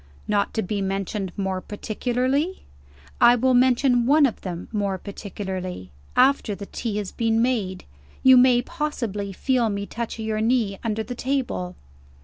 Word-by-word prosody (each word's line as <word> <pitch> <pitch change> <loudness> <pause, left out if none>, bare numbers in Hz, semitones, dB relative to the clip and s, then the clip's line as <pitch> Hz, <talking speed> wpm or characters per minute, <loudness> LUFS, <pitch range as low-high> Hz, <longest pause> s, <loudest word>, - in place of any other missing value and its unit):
"Not 205 -1 +1
to 220 - 0
be 200 +2 -2
mentioned 195 0 -2
more 190 -2 -2
particularly?" 255 - -2 0.6
"I 240 - +8
will 255 +2 +2
mention 245 -1 +3
one 295 +2 +6
of 250 - -2
them 175 -2 -6
more 200 -3 -1
particularly. 190 - -6 0.2
After 255 -5 +3
the 200 - -7
tea 215 0 -4
has 205 -3 -3
been 225 -1 +1
made, 220 -7 -1 0.4
you 260 0 +8
may 245 -1 +5
possibly 240 - -3
feel 245 +3 +1
me 200 -1 -3
touch 235 +2 -5
your 220 -1 -2
knee 220 -4 +1
under 220 -1 -1
the 245 - -6
table." 245 -9 -2
220 Hz, 150 wpm, -24 LUFS, 200-250 Hz, 0.6 s, I